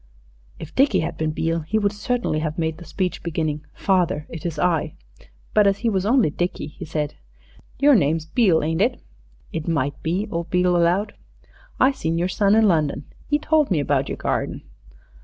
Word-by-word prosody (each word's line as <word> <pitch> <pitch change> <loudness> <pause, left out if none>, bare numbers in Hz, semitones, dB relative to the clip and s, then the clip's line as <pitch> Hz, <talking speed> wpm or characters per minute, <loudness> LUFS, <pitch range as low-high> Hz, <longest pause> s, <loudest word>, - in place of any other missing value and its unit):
If 160 - -9
Dickie 260 - +3
had 165 +2 -3
been 155 -1 -1
Beale 165 +2 -1
he 165 +8 -2
would 205 -2 +1
certainly 225 -6 -1
have 155 0 -3
made 160 -1 -2
the 175 - -10
speech, 185 0 -2
beginning, 155 -3 -2
"Father, 180 -5 +1
it 165 +1 -5
is 160 -3 -5
I." 160 -2 0 0.6
But 210 -1 +5
as 195 0 +2
he - - +4
was 195 -2 0
only 235 - +3
Dickie, 175 -2 -3
he - - -9
said 150 -1 -3 0.6
"Your 285 +2 +5
name's 160 - +2
Beale, 180 -3 +3
ain't 160 +3 0
it?" 245 +4 +1 0.5
"It 160 -1 -4
might 145 -4 -1
be," 180 +6 -1
old 170 -1 -3
Beale 180 0 +2
allowed. 175 +4 +2 0.7
"I 260 - +5
seen 165 - -2
your 175 +2 0
son 200 +2 +3
in 220 -1 +5
London. 155 -5 +1 0.3
'E 295 - +3
told 310 -1 +2
me 175 -6 +2
about 140 -1 0
yer - - -2
garden." - - -2
170 Hz, 190 wpm, -22 LUFS, 155-205 Hz, 0.7 s, But